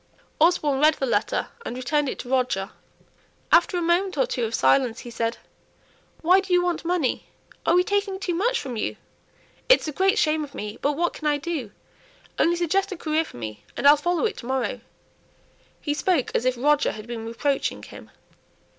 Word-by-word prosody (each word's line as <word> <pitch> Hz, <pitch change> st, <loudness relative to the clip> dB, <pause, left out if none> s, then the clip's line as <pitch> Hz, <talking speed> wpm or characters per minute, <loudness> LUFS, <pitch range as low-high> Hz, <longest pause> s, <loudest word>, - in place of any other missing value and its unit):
Osborne 305 Hz, -4 st, +3 dB
read 305 Hz, +1 st, +5 dB
the 270 Hz, -, -2 dB
letter 230 Hz, -3 st, 0 dB
and 245 Hz, -, -5 dB
returned 285 Hz, +3 st, 0 dB
it -, -, -5 dB
to -, -, -8 dB
Roger. 250 Hz, -7 st, 0 dB, 0.8 s
After 375 Hz, -, +4 dB
a 350 Hz, -, -1 dB
moment 350 Hz, +1 st, +1 dB
or 265 Hz, -, +3 dB
two 240 Hz, -, -2 dB
of 225 Hz, +1 st, -2 dB
silence 255 Hz, -3 st, +2 dB
he 240 Hz, -, -9 dB
said, 230 Hz, 0 st, -2 dB, 0.8 s
"Why 360 Hz, +4 st, +5 dB
do 385 Hz, -1 st, -6 dB
you 355 Hz, 0 st, +4 dB
want 350 Hz, -2 st, -1 dB
money? 335 Hz, -6 st, -1 dB, 0.4 s
Are 335 Hz, -, +5 dB
we 360 Hz, -, +5 dB
taking 400 Hz, 0 st, -1 dB
too 365 Hz, -3 st, -2 dB
much 470 Hz, +8 st, +1 dB
from 255 Hz, -4 st, -5 dB
you? 215 Hz, -, -2 dB, 0.7 s
It's -, -, +5 dB
a -, -, -2 dB
great 385 Hz, +7 st, +2 dB
shame 310 Hz, -6 st, +2 dB
of 280 Hz, -2 st, -10 dB
me; 210 Hz, +2 st, -6 dB
but 290 Hz, -, +1 dB
what 345 Hz, +4 st, 0 dB
can 310 Hz, -, -4 dB
I 295 Hz, -1 st, +2 dB
do? 290 Hz, -7 st, -4 dB, 0.7 s
Only 340 Hz, +1 st, +3 dB
suggest 385 Hz, +4 st, 0 dB
a 380 Hz, -, -5 dB
career 315 Hz, 0 st, 0 dB
for 310 Hz, -, -12 dB
me, 110 Hz, -3 st, -7 dB
and 280 Hz, -, +3 dB
I'll 290 Hz, -, +9 dB
follow 345 Hz, +6 st, 0 dB
it 435 Hz, -2 st, -2 dB
to 235 Hz, -, -8 dB
morrow." 250 Hz, -3 st, -2 dB, 1.0 s
He 295 Hz, -, -2 dB
spoke 310 Hz, -3 st, 0 dB
as 240 Hz, -, 0 dB
if 255 Hz, -1 st, +1 dB
Roger 295 Hz, +3 st, +2 dB
had 215 Hz, 0 st, -9 dB
been 230 Hz, -1 st, -6 dB
reproaching 270 Hz, +4 st, -1 dB
him. -, -, -12 dB
295 Hz, 200 wpm, -24 LUFS, 250-350 Hz, 1.0 s, I'll